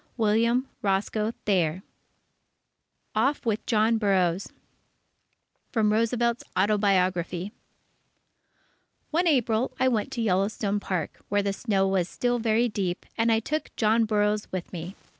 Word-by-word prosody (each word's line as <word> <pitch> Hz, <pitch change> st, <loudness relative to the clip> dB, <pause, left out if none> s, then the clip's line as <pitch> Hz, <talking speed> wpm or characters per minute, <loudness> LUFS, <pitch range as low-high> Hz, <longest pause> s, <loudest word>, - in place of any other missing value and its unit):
William 230 Hz, +4 st, +2 dB
Roscoe 210 Hz, +2 st, 0 dB
Thayer 185 Hz, -3 st, +1 dB, 1.3 s
OFF 265 Hz, +6 st, +1 dB
WITH 220 Hz, -2 st, 0 dB
JOHN 225 Hz, 0 st, +3 dB
BURROUGHS 190 Hz, -3 st, +1 dB, 1.2 s
From 215 Hz, -3 st, +2 dB
Roosevelt's 235 Hz, +1 st, +1 dB
Autobiography 185 Hz, -2 st, +1 dB, 1.6 s
One 345 Hz, +3 st, +2 dB
April, 245 Hz, -5 st, +2 dB
I 260 Hz, -, +3 dB
went 230 Hz, -1 st, 0 dB
to 240 Hz, -, -2 dB
Yellowstone 200 Hz, +1 st, 0 dB
Park, 185 Hz, -3 st, -3 dB
when 205 Hz, 0 st, +1 dB
the 200 Hz, -, 0 dB
snow 195 Hz, -3 st, 0 dB
was 185 Hz, -2 st, 0 dB
still 245 Hz, 0 st, 0 dB
very 225 Hz, +1 st, +2 dB
deep, 195 Hz, -5 st, -3 dB
and 230 Hz, 0 st, +2 dB
I 225 Hz, -, +4 dB
took 305 Hz, +7 st, -4 dB
John 225 Hz, +1 st, +3 dB
Burroughs 210 Hz, -1 st, 0 dB
with 185 Hz, -1 st, -5 dB
me. 175 Hz, +3 st, -6 dB
210 Hz, 120 wpm, -26 LUFS, 195-230 Hz, 1.6 s, I